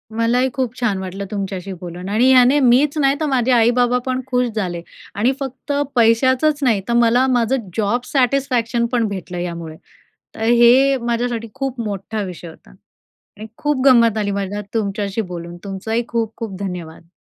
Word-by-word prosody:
मलाही 240 +3 +2
खूप 255 -4 -2
छान 225 -6 0
वाटलं 190 +1 -5
तुमच्याशी 195 -2 -4
बोलून. 180 +2 -7
आणि 240 +5 +3
ह्याने 255 +3 +5
मीच 275 +4 +3
नाही 275 -1 +3
तर 315 - -1
माझे 255 -2 +1
आई-बाबा 245 +1 +3
पण 260 0 -1
खुश 250 -1 +1
झाले 180 -5 -3 0.3
आणि 230 +6 +2
फक्त 270 +1 -6 0.2
पैशाचंच 260 +6 +3
नाही 225 -6 +2
तर 235 - 0
मला 240 +2 +4
माझं 245 -2 0
जॉब 225 +3 +1
सॅटिस्फॅक्शन 250 -3 +1
पण 235 -3 +1
भेटलं 185 -3 -6
यामुळे. 170 -2 -5 0.6
तर - - -7
हे 240 +4 +5
माझ्यासाठी 235 -1 -2
खूप 270 -2 -4
मोठा 210 0 -4
विषय 180 -2 -7
होता. 160 - -16 0.7
आणि 215 - -7
खूप 295 -3 -1
गंमत 235 -4 +5
आली 205 -1 -1
मला 200 +1 -3
तुमच्याशी 205 -1 -2
बोलून. 175 -3 -7
तुमचंही 205 +4 -2
खूप-खूप 225 -3 -4
धन्यवाद. 170 -4 -7
230 Hz, 155 wpm, -19 LUFS, 200-255 Hz, 0.7 s, ह्याने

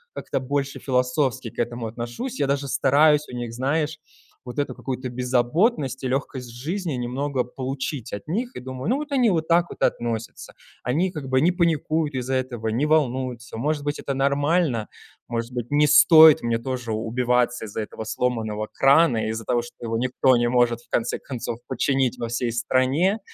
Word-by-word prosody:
как-то - - -3
больше 140 +1 -2
философски 125 -1 0
к - - -13
этому 120 -1 -2
отношусь. 120 - -5
Я 140 - +1
даже 140 0 -1
стараюсь 150 +4 +4
у 125 - -7
них, 120 -2 -5
знаешь, 150 +5 -1 0.5
вот 125 +2 -8
эту 145 - -1
какую-то 130 -1 -5
беззаботность 130 - 0
и - - 0
лёгкость 130 -1 -3
жизни 160 +8 -4
немного 130 +2 -2
получить 130 0 -5
от 100 - -5
них, 235 +10 -3
и - - -6
думаю: 130 +5 -5
"Ну, 250 - +3
вот 295 +1 -5
они 255 -4 +3
вот 160 -4 0
так 170 +1 +4
вот - - -11
относятся, 115 -1 -2 0.3
они 160 +10 0
как 150 -6 -6
бы 130 0 +2
не 170 +4 +4
паникуют 160 -3 0
из-за 130 +1 -1
этого, 120 -4 -2
не 120 +7 0
волнуются". 130 -6 0
Может 145 +4 -1
быть, 145 0 -2
это 140 - -3
нормально, 140 -2 +1 0.4
может 115 0 -3
быть, 120 -1 -4
не 150 +1 +3
стоит 155 +1 +8
мне 115 -1 0
тоже 125 -1 -4
убиваться 120 +2 0
из-за 110 +1 -4
этого 110 +1 -7
сломанного 110 -2 -2
крана, 135 -5 +4
из-за 110 +1 -4
того, 120 +2 +1
что 120 0 -12
его 115 -1 -1
никто 130 +1 +2
не 120 0 +2
может 120 -1 +2
в - - -27
конце 115 - -1
концов 120 -3 -5
починить 130 -1 0
во 115 - -4
всей 120 0 -1
стране, 130 - +1
130 Hz, 180 wpm, -24 LUFS, 120-150 Hz, 0.5 s, стоит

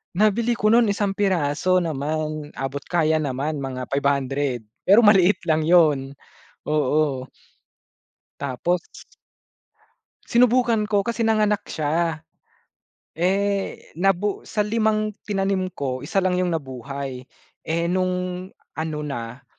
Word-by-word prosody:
Nabili 220 +3 +2
ko 215 - +2
'nun 230 -1 +5
isang 200 -1 -1
piraso 185 -2 +1
naman, 155 -1 -3
abot 135 +1 -5
kaya 160 -2 +1
naman 145 0 -2
mga 130 -2 -5
₱500, 140 -4 -1 0.2
pero 200 +4 +6
maliit 195 -1 +5
lang 155 -1 +2
'yun, 155 -5 +4 0.5
oo. 150 -3 0 1.1
Tapos. 140 +6 -1 1.5
Sinubukan 240 -2 +3
ko 205 -1 +1
kasi 230 +2 -1
nanganak 215 -1 +2
siya, 160 +1 -1 0.9
eh, 195 +3 -1
nabu 195 +1 +1
sa 210 -2 0
limang 215 0 +1 0.2
tinanim 195 -2 0
ko, 130 -2 -3
isa 195 +6 -1
lang 180 -1 +1
yung 180 - +1
nabuhay 135 -1 -6 0.5
eh, 170 +1 0
nung 180 0 -1 0.3
ano 155 -1 -2
na, 125 -2 -6
170 Hz, 110 wpm, -23 LUFS, 140-200 Hz, 1.5 s, pero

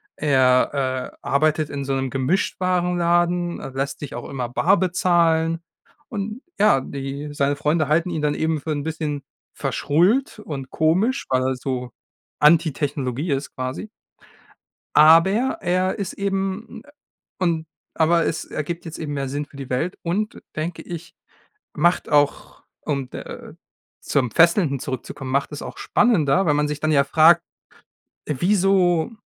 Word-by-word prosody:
Er, 130 -1 +2
äh, - - -31
arbeitet 155 +3 +1
in 140 -1 -4
so 135 0 -2
'nem 135 -1 -1
Gemischtwarenladen, 175 +3 +1
er - - -7
lässt 135 +1 -3
sich 145 - -7
auch 120 - -7
immer 125 -3 -4
bar 180 +10 +3
bezahlen. 170 -3 +2 0.5
Und 215 0 -5 0.2
ja, 205 -9 +5
die 140 +2 -6
seine 145 0 +1
Freunde 150 +1 +1
halten 165 +4 +1
ihn 160 -3 -2
dann 150 -1 0
eben 160 -1 0
für 160 - -4
'n 145 -1 -2
bisschen 155 -2 -3 0.3
verschrullt 190 - +1
und 140 -9 -6
komisch, 190 - +1
weil 130 -1 +2
er 130 0 0
so 125 -1 -4 0.5
anti 160 +2 +5
Technologie 140 +1 -2
ist 140 +1 -3
quasi. 130 +11 -4 1.1
Aber 165 +4 +7 0.3
er 185 0 +1
ist 195 -3 -4
eben, 195 +2 -3
äh 290 - -18 0.5
und 165 -4 0 0.3
aber 165 +1 +3
es 160 - -2
ergibt 170 +3 -5
jetzt 165 - -7
eben 150 -2 -4
mehr 140 -2 -3
Sinn 145 +2 -3
für 145 - -17
die 135 -2 -7
Welt 145 +8 -2
und, 200 +6 -2
denke 165 +2 -3
ich, 170 -1 -8 0.6
macht 175 +3 +2
auch, 145 -1 +1 0.2
um 140 -4 -3
d - - -8
äh, - - -9 0.5
zum 130 -4 0
Fesselnden 165 - +3
zurückzukommen, 130 +1 -6
macht 140 +1 0
es 150 - -6
auch - - -8
spannender, 190 - +2
weil 150 - +3
man 150 0 +1
sich 150 0 -4
dann 155 +1 0
ja 140 -1 +5
fragt: 160 +4 +5 0.9
„Wieso 180 - +2
155 Hz, 150 wpm, -22 LUFS, 140-175 Hz, 1.1 s, Aber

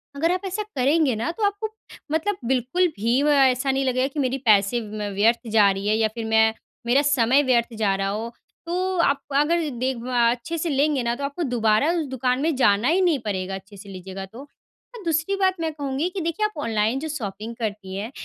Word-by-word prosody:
अगर 325 +4 +1
आप 365 0 -1
ऐसा 385 +3 -2
करेंगे 280 0 +3
ना, 230 +10 -2
तो 425 +6 -5
आपको 410 +2 -1 0.4
मतलब 365 +5 0
बिल्कुल 260 +9 +1
भी 235 +6 +1
व 300 - +3
ऐसा 270 -1 +3
नहीं 270 0 0
लगेगा 255 +1 +1
कि 290 +2 -6
मेरी 265 -1 0
पैसे 210 +2 +4
म 210 -1 -5
व्यर्थ 230 +4 +2
जा 210 -2 +5
रही 195 +1 -4
है 215 - +3
या 220 - +3
फिर 230 -1 -4
मैं 220 0 +3 0.3
मेरा 255 +4 +4
समय 275 -1 +3
व्यर्थ 240 -3 +1
जा 210 -3 +2
रहा 195 0 -1
हो। 220 +3 -4 0.3
तो 365 +2 -1
आप 280 -4 +2
अगर 315 +2 +2
देक 255 -1 -1
बा 240 -1 +2
अच्छे 250 +8 -4
से 330 +1 -2
लेंगे 285 -1 +1
ना, 235 0 0
तो 280 - -7
आपको 285 +5 -3
दोबारा 240 0 +2
उस 340 -3 -1
दुकान 255 -1 -1
में 315 0 +1
जाना 215 -2 +3
ही 360 +4 +3
नहीं 340 -6 +2
पड़ेगा, 190 -2 -2
अच्छे 195 +2 -11
से 200 +1 -12
लीजिएगा 190 0 -7
तो। 220 +6 -13 0.6
और 450 - -9
दूसरी 325 +4 0
बात 380 -1 +2
मैं 325 -1 -1
कहूँगी 285 +3 -2
कि 370 0 -5
देखिए, 335 +6 -1
आप 425 -5 -4
ऑनलाइन 225 +3 0
जो 315 - -4
शॉपिंग 220 -4 -5
करती 205 -4 -4
हैं, 215 +6 -5
255 Hz, 220 wpm, -23 LUFS, 220-315 Hz, 0.6 s, जा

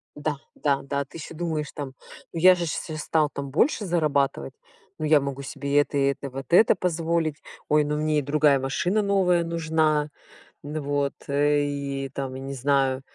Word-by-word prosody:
Да, 150 -1 -2 0.2
да, 140 -2 +1
да, 140 0 -2
ты 140 - -12
еще 165 +1 -8
думаешь 155 -2 -3
там: 135 -2 -6 0.4
ну 165 - -3
я 185 +2 +7
же 175 - -2
сейчас 155 -1 -4
стал 155 -1 +1
там 140 -1 -6
больше 210 - +2
зарабатывать, 145 - 0 0.4
ну 155 - -3
я 150 -2 +5
могу 140 0 -4
себе 140 +1 0
это 145 0 0
и - - +2
это, 140 0 -6
вот 135 0 -7
это 210 +5 +6
позволить, 165 -3 -1 0.3
ой, 150 0 +4
ну 150 +1 -1
мне 155 0 +1
и - - -1
другая 145 0 +3
машина 175 +10 0
новая 190 -4 +2
нужна. 160 -2 +1 0.5
Вот, 145 -1 -2 0.2
и 140 -1 0
там, 135 -2 -4
я 130 - -6
не 135 +1 -5
знаю, 135 0 +1
150 Hz, 180 wpm, -25 LUFS, 140-160 Hz, 0.5 s, я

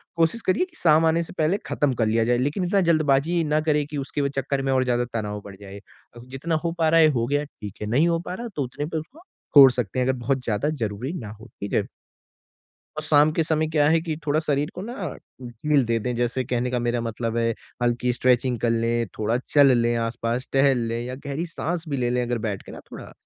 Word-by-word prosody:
कोशिश 165 +7 +1
करिए 185 - +2
कि 360 -3 -21
शाम 160 -1 +4
आने 165 +1 +2
से - - -9
पहले 160 +5 +2
ख़त्म 145 -3 0
कर - - +4
लिया 115 +1 +2
जाए। 120 +1 +2
लेकिन 145 +9 -1
इतना 195 +2 +2
जल्दबाज़ी 155 +2 +2
ना 150 0 +1
करें 150 -1 +2
कि 150 -1 -6
उसके 140 +1 -3
व 140 - +1
चक्कर 135 0 -1
में 135 0 -1
और 130 - +3
ज़्यादा 120 -1 0
तनाव 105 -2 -3
बढ़ 100 -1 -9
जाए। 100 0 -9 0.4
अ, - - -10
जितना 145 +6 -2
हो 170 - 0
पा 160 -1 +3
रहा 165 +1 +5
है, 160 - +7
हो 125 -6 +1
गया, 145 +2 0
ठीक 105 -8 -10
है, 105 - -3
नहीं 140 +9 +3
हो 170 -1 +1
पा - - -3
रहा, 235 +5 -5
तो 145 - 0
उतने 135 +3 -5
पे 160 +1 -4
उसको 250 - -8 0.4
छोड़ 135 -3 +10
सकते 125 0 -3
हैं 125 - +2
अगर 130 - 0
बहुत 130 +1 -1
ज़्यादा 115 +5 -1
ज़रूरी 120 -1 -3
ना 110 - -7
हो, 115 - -12
ठीक 100 - -5
है। - - +2 1.1
और 155 - -3
शाम 150 0 +4
के 165 - +1
समय 155 0 +1
क्या 150 -2 +3
है 165 0 +4
कि 160 -2 -4
थोड़ा 150 +1 +2
शरीर 150 0 -1
को 180 - -6
ना 205 -5 -5 0.3
ढील 130 +3 0
दे 115 0 0
दें। 125 +3 -3
जैसे 120 +2 -1
कहने 125 0 -1
का 125 - 0
मेरा 120 0 -1
मतलब 115 0 -3
है, 115 0 +1 0.3
हल्की 120 +1 +1
स्ट्रेचिंग 125 0 +1
कर 120 - +1
लें, 115 0 0
थोड़ा 110 +2 +1
चल 140 -3 +6
लें 120 0 +1
आस-पास, 115 +2 -2
टहल 135 -1 +4
लें, 115 +1 -2
या 125 +1 -5
गहरी 145 +5 -3
साँस 170 +1 -3
भी 140 - -1
ले 120 -1 0
लें 125 0 +1
अगर 120 0 -1
बैठ 100 -2 -4
के - - -12
ना - - -9
थोड़ा, - - -10
135 Hz, 250 wpm, -24 LUFS, 120-155 Hz, 1.1 s, छोड़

